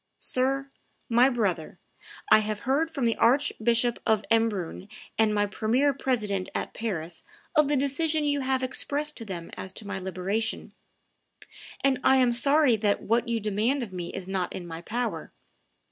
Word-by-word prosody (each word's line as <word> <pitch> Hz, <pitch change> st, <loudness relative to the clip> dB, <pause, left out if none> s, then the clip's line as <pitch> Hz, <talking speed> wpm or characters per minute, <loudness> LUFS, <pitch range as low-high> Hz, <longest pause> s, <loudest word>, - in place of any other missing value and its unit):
"Sir, 270 Hz, +2 st, 0 dB, 0.4 s
my 245 Hz, +3 st, +5 dB
brother, 200 Hz, -10 st, -1 dB, 0.5 s
I -, -, +9 dB
have 215 Hz, -1 st, -3 dB
heard 285 Hz, +6 st, +1 dB
from 280 Hz, -6 st, -2 dB
the 230 Hz, -, +2 dB
Archbishop 240 Hz, -2 st, +2 dB
of 215 Hz, -2 st, +1 dB
Embrun 210 Hz, -5 st, 0 dB, 0.3 s
and 220 Hz, -1 st, +4 dB
my 205 Hz, -1 st, +2 dB
premier 235 Hz, +7 st, +1 dB
president 210 Hz, -8 st, -1 dB
at -, -, -3 dB
Paris 175 Hz, -7 st, -4 dB, 0.3 s
of 300 Hz, -2 st, +5 dB
the 290 Hz, 0 st, +1 dB
decision 300 Hz, +3 st, +1 dB
you 290 Hz, -1 st, +1 dB
have 260 Hz, -1 st, 0 dB
expressed 290 Hz, +3 st, 0 dB
to 230 Hz, -, -5 dB
them 175 Hz, -5 st, -7 dB
as 190 Hz, -, -6 dB
to 210 Hz, -, -4 dB
my 200 Hz, -1 st, -4 dB
liberation, 190 Hz, +4 st, -3 dB, 1.1 s
and 270 Hz, -2 st, +3 dB
I 265 Hz, -, +5 dB
am 255 Hz, -2 st, +4 dB
sorry 275 Hz, +2 st, +3 dB
that 205 Hz, -1 st, 0 dB
what 235 Hz, +2 st, +1 dB
you 230 Hz, -1 st, 0 dB
demand 220 Hz, +6 st, 0 dB
of 205 Hz, -5 st, -8 dB
me 175 Hz, -1 st, -5 dB
is 190 Hz, -1 st, -7 dB
not 190 Hz, -2 st, -2 dB
in 180 Hz, -, -6 dB
my 165 Hz, -1 st, -7 dB
power. 235 Hz, +6 st, -3 dB
230 Hz, 165 wpm, -27 LUFS, 200-265 Hz, 1.1 s, I